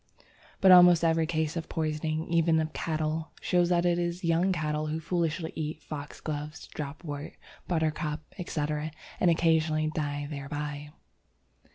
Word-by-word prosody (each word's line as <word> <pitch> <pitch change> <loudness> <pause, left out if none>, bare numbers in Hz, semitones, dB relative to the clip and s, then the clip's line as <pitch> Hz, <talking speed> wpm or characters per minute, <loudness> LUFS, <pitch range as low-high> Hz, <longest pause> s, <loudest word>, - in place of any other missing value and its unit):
But 190 -2 +7
almost 180 -2 +8
every 165 -1 +3
case 160 -1 -1
of 165 -1 -4
poisoning, 155 0 -2
even 165 -1 +3
of 155 0 -2
cattle, 155 0 -2
shows 175 -1 +2
that 175 -1 +2
it 175 0 +2
is 175 +1 -2
young 170 +3 +2
cattle 155 -3 -1
who 155 +1 -2
foolishly 165 -1 -1
eat 155 0 -4
foxgloves, 150 +1 -6
dropwort, 145 0 -6 0.3
buttercup, 155 -2 -1 0.2
etc., 150 -3 -2 0.3
and 180 - +4
occasionally 160 -2 +2
die 145 -2 -2
thereby. 145 0 -5
160 Hz, 135 wpm, -29 LUFS, 150-170 Hz, 0.3 s, almost